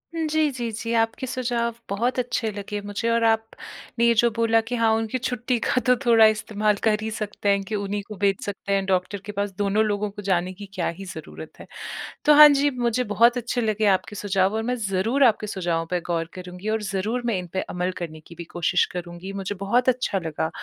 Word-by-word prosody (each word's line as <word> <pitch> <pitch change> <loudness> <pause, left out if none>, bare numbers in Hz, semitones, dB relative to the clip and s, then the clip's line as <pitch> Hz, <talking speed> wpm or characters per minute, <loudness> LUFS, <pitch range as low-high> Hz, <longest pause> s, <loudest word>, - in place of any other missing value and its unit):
हुँ। 325 -1 -1
जी, 310 -1 +2
जी, 240 -3 -4
जी। 225 +2 -4
आपके 225 +3 -1
सुझाव 240 -2 -1 0.2
बहुत 235 +6 0
अच्छे 240 -2 -1
लगे 205 0 -5
मुझे 205 +3 -3
और 230 0 +2
आपने 225 +1 -1
ये 235 - +5
जो 240 - +3
बोला 230 0 +3
कि 235 +2 -4
हाँ 230 -1 +3
उनकी 225 +3 -1
छुट्टी 250 0 -1
का 255 - +1
तो 250 - +6
थोड़ा 230 -2 +7
इस्तेमाल 215 -1 +1
कर 215 -1 +3
ही 220 - -3
सकते 210 -1 -3
हैं 200 0 +2
कि 215 +2 -4
उन्हीं 205 0 -2
को 215 - -8
भेज 195 0 +1
सकते 200 0 -3
हैं 195 -1 +1
डॉक्टर 190 +1 0
के 210 - -5
पास। 205 0 -2
दोनों 205 +1 +2
लोगों 210 0 -1
को 205 - -9
जाने 185 -2 0
की 200 +2 -9
क्या 180 -3 -1
ही 195 - -7
ज़रूरत 190 - -10
है। - - -11 0.6
तो 300 - +7
हाँ, 300 0 +11
जी 285 0 +3
मुझे 245 -2 0
बहुत 235 +4 +5
अच्छे 245 +1 -2
लगे 215 -1 0
आपके 210 +3 -7
सुझाव 195 -1 +1
और 220 - -1
मैं 250 +2 -1
ज़रूर 225 +9 +1
आपके 220 -3 +3
सुझावों 170 -4 -1
पे 180 - +1
गौर 165 -1 0
करूँगी 180 +2 -7
और 220 0 0
ज़रूर 210 +5 -2
मैं 230 -5 +1
इन 180 - -7
पर - - +1
अमल 180 +1 -1
करने 160 -3 -6
की 170 - -12
भी 170 - -7
कोशिश 175 +1 +2
करूँगी। 175 +2 -6
मुझे 200 +2 -4
बहुत 220 +7 +1
अच्छा 245 -6 0
लगा। 160 -2 -3
210 Hz, 225 wpm, -24 LUFS, 195-235 Hz, 0.6 s, हाँ